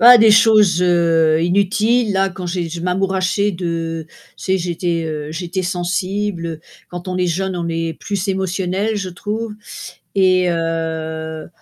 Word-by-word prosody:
Bah, 240 +1 +10
des 220 -1 +7
choses, 210 -5 +5
heu, 165 -3 +3
inutiles, 205 +6 +2
là, 195 0 +2
quand 185 -1 -7
j'ai 175 -1 -2
je 165 +1 -6
m'amourachais 190 +2 0
de 165 -2 -3
tu - - -22 0.3
sais, 190 0 +1
j'étais, 170 -1 -2
heu, 150 -1 -4
j'étais 175 +3 -3
sensible. 180 -1 -2 0.3
Quand 175 0 -8
on 185 0 -3
est 180 0 +1
jeune, 190 +2 -1
on 170 -1 -3
est 165 -1 -2
plus 200 -3 -3
émotionnel, 190 +2 -1
je 200 -2 -3
trouve 210 +5 -4 0.6
et 185 -2 +4
heu, 160 -1 -3
180 Hz, 150 wpm, -19 LUFS, 165-195 Hz, 0.6 s, Bah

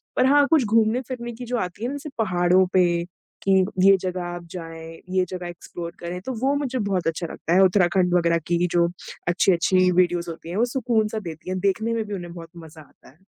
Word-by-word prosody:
पर 255 - +3
हाँ 285 +1 +5
कुछ 310 -6 +4
घूमने-फिरने 235 +3 0
की 245 +2 -8
जो 245 +1 -2
आती 185 +1 -4
है 240 - -1
ना 280 - -4
जैसे 290 +2 -7
पहाड़ों 185 -3 +3
पे 185 -1 +5 0.6
कि 195 - +1 0.3
ये 195 0 +8
जगह 185 -1 -3
आप 175 0 -6
जाएँ, 165 -2 -9
ये 185 0 +1
जगह 180 -1 -5
एक्सप्लोर 170 0 -8
करें, 175 +1 -5
तो 260 +7 -5
वो 275 +2 +2
मुझे 265 -3 -2
बहुत 195 -5 -1
अच्छा 165 +1 -2
लगता 165 - -3
है 190 +2 +6
उत्तराखंड 180 -1 +3
वग़ैरह 170 -1 +3
की 175 +1 +1
जो 170 -1 +3 0.4
अच्छी-अच्छी 180 +1 +3
वीडियोज़ 175 -1 +1
होती 165 0 -8
हैं, 175 - -4
वो 235 - +3
सुकून 235 -3 0
सा 220 - -3
देती 165 -3 -8
हैं। 185 0 -2
देखने 210 +4 0
में 225 -1 -1
भी 210 - -6
उन्हें 175 -2 -7
बहुत 165 -1 -10 0.2
मज़ा 160 0 -13
आता 150 - -20
है। 135 - -23
185 Hz, 220 wpm, -23 LUFS, 175-225 Hz, 0.6 s, ये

